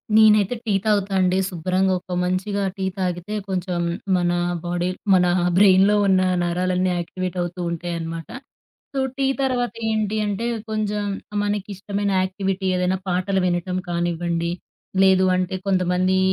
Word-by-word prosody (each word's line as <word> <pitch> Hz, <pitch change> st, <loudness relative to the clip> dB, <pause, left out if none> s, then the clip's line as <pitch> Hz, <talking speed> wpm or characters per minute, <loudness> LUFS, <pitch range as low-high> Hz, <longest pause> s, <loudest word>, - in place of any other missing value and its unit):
నేనైతే 215 Hz, 0 st, +5 dB
టీ 210 Hz, -, +1 dB
తాగుతా 205 Hz, -2 st, +1 dB
అండి. 185 Hz, +1 st, +2 dB
శుభ్రంగా 185 Hz, +1 st, 0 dB
ఒక 180 Hz, -, -8 dB
మంచిగా 190 Hz, +3 st, -1 dB
టీ 190 Hz, -1 st, -3 dB
తాగితే 180 Hz, +2 st, -3 dB
కొంచెం 180 Hz, -2 st, -2 dB, 0.4 s
మన 175 Hz, -1 st, +1 dB, 0.3 s
బాడీ, 175 Hz, +1 st, -1 dB, 0.2 s
మన 180 Hz, -1 st, +5 dB, 0.3 s
బ్రెయిన్‌లో 195 Hz, +1 st, +6 dB
ఉన్న 190 Hz, -1 st, +4 dB, 0.2 s
నరాలన్నీ 180 Hz, +1 st, 0 dB
యాక్టివేట్ 185 Hz, +1 st, -4 dB
అవుతూ 175 Hz, +1 st, -4 dB
ఉంటాయన్నమాట. 165 Hz, -1 st, -5 dB, 0.6 s
సో, 270 Hz, -, -1 dB, 0.2 s
టీ 275 Hz, -, +1 dB, 0.2 s
తరువాత 245 Hz, -4 st, 0 dB, 0.2 s
ఏంటి 215 Hz, -1 st, 0 dB
అంటే, 205 Hz, +3 st, -2 dB, 0.2 s
కొంజెం 210 Hz, -1 st, -1 dB, 0.4 s
మనకిష్టమైన 205 Hz, 0 st, -2 dB
యాక్టివిటీ 190 Hz, 0 st, -2 dB
ఏదైనా 180 Hz, +1 st, +1 dB
పాటలు 185 Hz, +2 st, 0 dB
వినటం 180 Hz, +1 st, -1 dB
కానివ్వండి, 170 Hz, 0 st, -1 dB, 0.5 s
లేదు 190 Hz, -1 st, +5 dB
అంటే, 185 Hz, +1 st, -1 dB
కొంతమంది 185 Hz, 0 st, +2 dB
185 Hz, 125 wpm, -22 LUFS, 180-205 Hz, 0.6 s, బ్రెయిన్‌లో